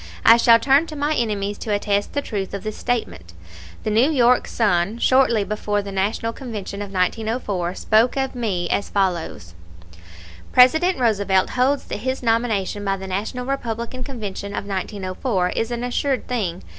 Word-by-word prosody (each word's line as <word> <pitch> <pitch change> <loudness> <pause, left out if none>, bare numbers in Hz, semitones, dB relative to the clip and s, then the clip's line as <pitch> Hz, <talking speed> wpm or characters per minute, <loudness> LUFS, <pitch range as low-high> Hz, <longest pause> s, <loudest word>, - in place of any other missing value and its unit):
I 230 - +9
shall 230 -1 +6
turn 275 +6 +3
to 310 - -8
my 295 +1 0
enemies 205 -6 -2
to 215 - -4
attest 205 0 0
the 285 - -1
truth 200 -3 -4
of 200 - -6
this 215 -1 -4
statement. 220 - -3 0.5
The 215 - -1
New 230 +7 +4
York 250 -4 +3
Sun, 200 -1 +1
shortly 240 -3 +3
before 205 0 -2
the 200 - -7
National 205 +4 -1
Convention 210 -6 -6
of 200 -1 -6
1904, 195 -2 -1
spoke 225 +6 +2
of 265 -1 -1
me 200 -8 -2
as 200 - -1
follows: 175 - -2 1.0
"President 315 +9 +5
Roosevelt 200 -6 +1
holds 265 +3 +1
that - - -4
his 260 +3 -3
nomination 225 -4 0
by 195 -1 0
the 190 - -8
National 210 +7 -3
Republican 250 -1 -4
Convention 205 -6 -6
of - - -4
1904 190 0 -2
is 225 - -2
an 240 0 -3
assured 260 +2 -1
thing. 195 -8 -2
220 Hz, 165 wpm, -21 LUFS, 195-250 Hz, 1.0 s, I